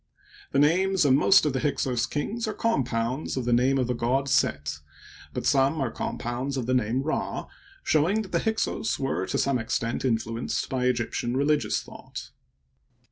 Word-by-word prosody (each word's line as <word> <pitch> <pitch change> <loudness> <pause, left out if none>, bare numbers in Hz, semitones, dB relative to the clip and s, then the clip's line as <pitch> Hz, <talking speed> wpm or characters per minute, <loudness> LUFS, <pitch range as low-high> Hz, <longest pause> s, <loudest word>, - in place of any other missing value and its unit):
The - - 0
names 180 +4 +3
of 135 - +5
niost 155 +6 +5
of 150 - +1
the 130 - 0
Hyksos 130 -4 0
kings 220 +10 -3
are 215 - -3
compounds 125 - -1
of 130 - -2
the 120 - +2
name 130 +3 +3
of 130 - +1
the 125 - -1
god 125 +4 0
Set, 75 - +1 0.5
but - - -4
some 140 +3 +3
are 130 -4 -1
compounds 125 +4 -3
of 125 - -2
the 130 - 0
name 125 +1 +1
Rd, 155 - -2 0.4
showing 180 +9 +2
that 190 - -11
the - - +2
Hyksos 220 0 -1
were 135 -9 -2
to - - -1
some 135 -3 +1
extent 115 +1 -2
influenced 115 -2 -1
by 130 -1 0
Egyptian 120 0 0
religious 145 +2 +1
thought. - - -10
130 Hz, 175 wpm, -26 LUFS, 120-150 Hz, 0.5 s, of